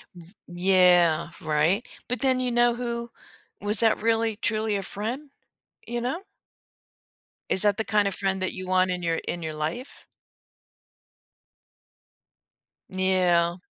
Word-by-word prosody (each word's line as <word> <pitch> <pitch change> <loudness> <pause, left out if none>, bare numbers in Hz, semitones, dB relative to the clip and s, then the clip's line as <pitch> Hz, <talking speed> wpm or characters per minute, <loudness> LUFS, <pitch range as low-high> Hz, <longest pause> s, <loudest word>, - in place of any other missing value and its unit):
V 175 +1 -13
Yeah, 175 -2 +3
right, 155 +9 +1 0.2
but 245 -1 -3
then 260 -1 +2
you 255 - 0
know 240 0 +3
who 235 -1 -4 0.5
was 205 +1 +3
that 225 -2 +2
really 225 -1 +1
truly 215 -1 -1
a 200 - -1
friend, 235 +10 -5 0.6
you 240 0 -3
know? 265 +10 -3 1.3
Is 190 - +2
that 205 -2 +3
the 220 - 0
kind 210 0 +2
of 200 - -2
friend 195 -1 -1
that 185 - -2
you 185 -1 -7
want 185 0 +2
in 180 0 -3
your 165 -1 0
in 175 - -3
your 160 -1 -5
life? 160 - -5 2.8
Yeah. 180 -2 +2
195 Hz, 135 wpm, -25 LUFS, 175-230 Hz, 2.8 s, Yeah